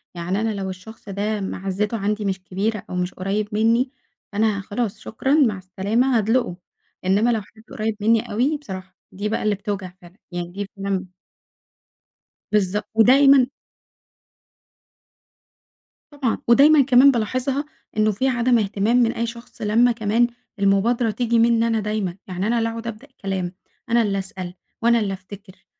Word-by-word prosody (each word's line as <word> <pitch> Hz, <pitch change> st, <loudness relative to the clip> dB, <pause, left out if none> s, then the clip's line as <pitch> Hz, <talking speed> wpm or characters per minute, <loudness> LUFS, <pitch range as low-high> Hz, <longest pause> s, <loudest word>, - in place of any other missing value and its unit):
يعني 180 Hz, +4 st, -2 dB
أنا 225 Hz, -1 st, 0 dB
لو 195 Hz, -2 st, -4 dB
الشخص 195 Hz, +3 st, -10 dB
ده 205 Hz, +2 st, -2 dB
معزّته 195 Hz, +3 st, -2 dB
عندي 210 Hz, +1 st, -1 dB
مش 190 Hz, -1 st, -2 dB
كبيرة، 200 Hz, +3 st, -2 dB
أو -, -, -5 dB
مش 180 Hz, 0 st, -2 dB
قريّب 200 Hz, +3 st, -2 dB
منّي، 230 Hz, +4 st, +2 dB, 0.4 s
فأنا 210 Hz, -1 st, +1 dB
خلاص 205 Hz, +1 st, -3 dB
شكرًا 265 Hz, +5 st, -2 dB
مع 260 Hz, -10 st, +4 dB
السلامة، 205 Hz, +7 st, 0 dB
هادلقُه، 225 Hz, -3 st, +1 dB, 0.5 s
إنما 200 Hz, +5 st, +3 dB
لو 225 Hz, -, 0 dB
حد 220 Hz, +2 st, -18 dB
قريّب 215 Hz, 0 st, -2 dB
منّي 225 Hz, +1 st, +2 dB
أوي، 260 Hz, +8 st, +1 dB
بصراحة 190 Hz, -9 st, -9 dB, 0.2 s
دي 205 Hz, +3 st, -3 dB
بقى 220 Hz, -, -1 dB
اللي 210 Hz, -1 st, +2 dB
بتوجع 200 Hz, -2 st, -4 dB
فعلًا، 175 Hz, +3 st, -16 dB
يعني 175 Hz, 0 st, -4 dB
دي 200 Hz, +2 st, -5 dB
فعلًا 195 Hz, -1 st, -2 dB, 1.5 s
بالضبط 205 Hz, -1 st, +1 dB
ودايمًا 265 Hz, +3 st, +6 dB, 2.7 s
طبعًا 270 Hz, -6 st, -1 dB
ودايمًا 280 Hz, +5 st, +7 dB
كمان 265 Hz, +1 st, +6 dB
بالاحظها، 255 Hz, +4 st, -1 dB, 0.3 s
إنه 215 Hz, 0 st, +3 dB
في 225 Hz, +6 st, 0 dB
عدم 240 Hz, -1 st, +3 dB
إهتمام 210 Hz, +3 st, +1 dB
من 235 Hz, -2 st, +4 dB
أي 235 Hz, -, -2 dB
شخص 235 Hz, 0 st, -10 dB
لمّا 225 Hz, +3 st, +4 dB
كمان 230 Hz, +1 st, +2 dB, 0.3 s
المبادرة 215 Hz, +4 st, +2 dB
تيجي 235 Hz, +1 st, +1 dB
منّي 230 Hz, 0 st, +4 dB
أنا 225 Hz, -1 st, +1 dB
دايمًا، 210 Hz, -4 st, -2 dB
يعني 185 Hz, +2 st, -2 dB
أنا 235 Hz, +1 st, +1 dB
اللي 230 Hz, 0 st, +1 dB
أقعد 230 Hz, 0 st, -6 dB
أبدأ 230 Hz, +4 st, -7 dB
الكلام، 195 Hz, -8 st, -4 dB, 0.4 s
أنا 235 Hz, 0 st, +4 dB
اللي 200 Hz, -3 st, 0 dB
أسأل، 185 Hz, -2 st, -6 dB, 0.3 s
وأنا 235 Hz, 0 st, +4 dB
اللي 200 Hz, -3 st, -1 dB
أفتكر، 195 Hz, 0 st, -12 dB
215 Hz, 155 wpm, -22 LUFS, 195-235 Hz, 2.7 s, ودايمًا